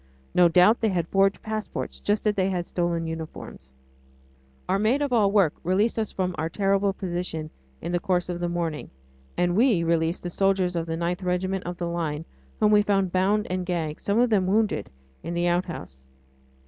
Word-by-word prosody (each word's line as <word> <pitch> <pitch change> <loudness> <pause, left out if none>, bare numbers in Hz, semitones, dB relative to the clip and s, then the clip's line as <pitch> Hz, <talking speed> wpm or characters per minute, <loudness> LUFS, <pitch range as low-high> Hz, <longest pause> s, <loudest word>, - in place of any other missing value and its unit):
No 180 -1 +6
doubt 180 +7 +5
they 220 - +2
had 175 -4 -1
forged 195 0 +2
passports, 215 -1 -4
just 205 +2 0
as 210 - +3
they 190 -2 +1
had 180 -2 -2
stolen 170 -2 -1
uniforms. 160 - -7 1.0
Our 195 - +1
maid 225 +7 +2
of 285 -3 -1
all 210 -4 +4
work 195 -7 +3
released 200 +7 +1
us 220 - -2
from 185 -1 -2
our 160 +1 -1
terrible 195 +2 +1
position 175 -5 -4 0.3
in - - -3
the 175 - +1
course 180 0 0
of 175 -1 -4
the 175 0 -1
morning, 170 -3 -3 0.5
and 175 0 +1
we 220 -6 +3
released 165 +1 0
the 175 - -4
soldiers 190 -1 +1
of 165 -1 -2
the 165 0 -2
9th 175 +2 -2
Regiment 185 +1 -1
of 175 0 -5
the 175 - -3
Line, 165 -2 -3 0.3
whom 210 - +4
we 210 0 +6
found 195 -3 +1
bound 200 +4 +2
and 185 0 -1
gagged, 165 -4 -3
some 200 +1 0
of 245 0 +3
them 190 -4 +3
wounded, 205 - +1 0.3
in 170 - -5
the 175 0 +1
outhouse. 170 - -3
180 Hz, 195 wpm, -25 LUFS, 170-200 Hz, 1.0 s, No